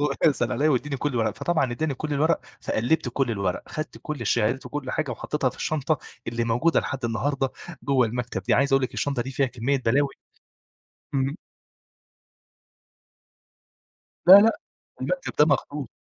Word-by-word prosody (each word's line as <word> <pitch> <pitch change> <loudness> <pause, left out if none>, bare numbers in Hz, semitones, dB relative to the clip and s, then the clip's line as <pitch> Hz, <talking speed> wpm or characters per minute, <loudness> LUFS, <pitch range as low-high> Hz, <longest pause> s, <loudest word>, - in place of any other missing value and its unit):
"بابا 145 -1 0
اسأل 140 - -1
عليا 150 +2 +2
واديني 140 0 0
كل 145 - -1
الورق." 110 -3 0
فطبعًا 140 -3 0
إدّاني 145 +4 -1
كل 150 +3 -4
الورق، 155 +3 +2 0.2
فقلّبت 125 +5 0
كل 125 0 0
الورق، 100 -4 -1
أخدت 155 +1 -6
كل 150 -5 -5
الشهادات 115 +3 0
وكل 145 -3 -4
حاجة 155 -2 -2
وحطيتها 130 +2 -1
في - - -16
الشنطة 155 -1 -1 0.3
اللي 115 0 -1
موجودة 120 +9 +2
لحد 130 -2 -5
النهارده 135 +4 0 0.3
جوا 135 -4 +3
المكتب 120 -3 -4
دي، - - +2
عايز 140 +1 +2
أقول 135 0 +4
لك 130 - -2
الشنطه 140 -4 -1
دي 130 - -6
فيها 135 +1 +1
كمّية 130 +3 -1
بلاوي 140 +5 +3 1.1
إمم. 135 +1 0 2.9
لا، 185 - +12
لا، 210 +3 +7 0.4
المكتب - - -2
ده 150 - +8
مخصوص، 145 -2 -1
135 Hz, 155 wpm, -25 LUFS, 120-150 Hz, 2.9 s, لا